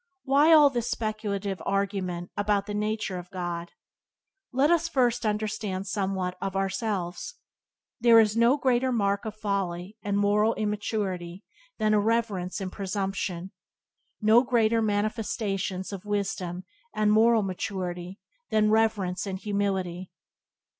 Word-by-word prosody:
Why 285 +4 +4
all 300 -3 +8
these 240 -3 -2
speculative 205 -3 -3
arguments 190 -3 -2
about 205 -1 +1
the 205 - -5
nature 210 -2 -2
of 175 0 -11
God? 175 -2 -4 0.8
Let 275 +5 +3
us 340 0 +2
first 245 -5 +1
understand 210 -2 -2
somewhat 190 -2 -2
of 195 -1 -3
ourselves. 195 -2 -2 0.6
There 235 -1 +6
are 220 - +7
no 235 +4 +4
greater 260 -1 +2
marks 200 -2 0
of 215 - -5
folly 200 -2 -3
and 200 0 -1
moral 210 +2 +3
immaturity 205 -4 -3 0.3
than 215 0 +2
irreverence 210 -4 0
and 190 -2 -4
presumption; 195 -2 -3 0.7
no 220 +2 +6
greater 230 -3 +2
manifestations 205 -3 -2
of 195 -1 -6
wisdom 190 -3 -3 0.3
and 210 0 +2
moral 225 0 +5
maturity 185 -1 -4 0.3
than 215 0 +3
reverence 210 -4 +1
and 190 -1 -3
humility. 190 -3 -2
205 Hz, 125 wpm, -27 LUFS, 190-220 Hz, 0.8 s, all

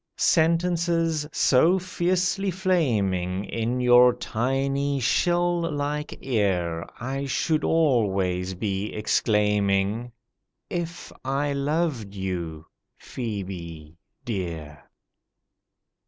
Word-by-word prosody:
Sentences 165 -1 +2
so 160 +9 +4
fiercely 185 +1 0
flaming 105 - 0
In 115 +5 -2
your 125 0 +6
tiny 135 +4 -1
shell 175 +6 +2
like 150 +1 -3
ear, 90 -9 0
I 135 +3 -3
should 155 +3 0
always 95 - +1
be 100 +1 -2
exclaiming 105 +1 +1 0.6
If 175 0 -4
I 140 +2 -1
loved 140 -7 -1
you, 85 -5 -4 0.3
PHŒBE 90 -9 -6 0.3
dear. 85 -9 -5
125 Hz, 80 wpm, -25 LUFS, 95-160 Hz, 0.6 s, your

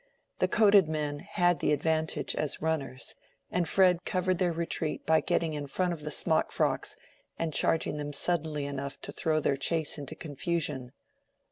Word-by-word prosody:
The - - +3
coated 205 -6 +5
men 150 -2 -2
had 175 0 +1
the - - +1
advantage 160 +2 0
as 150 - -1
runners, 140 -5 -3 0.4
and 175 -2 0
Fred 180 -2 +4
covered 185 -1 0
their 180 -2 +2
retreat 165 -1 -3
by 160 0 +4
getting 160 -2 0
in 145 -1 -4
front 180 +5 0
of 160 - -8
the 150 - -4
smock - - +1
frocks - - 0 0.4
and 165 -2 -2
charging 160 -1 +3
them 145 0 -4
suddenly 155 -1 -1
enough 140 0 -5
to - - -6
throw 155 -1 0
their 140 -2 +1
chase 160 +2 +1
into 140 - -7
confusion. 145 -4 -3
160 Hz, 165 wpm, -29 LUFS, 145-170 Hz, 0.4 s, coated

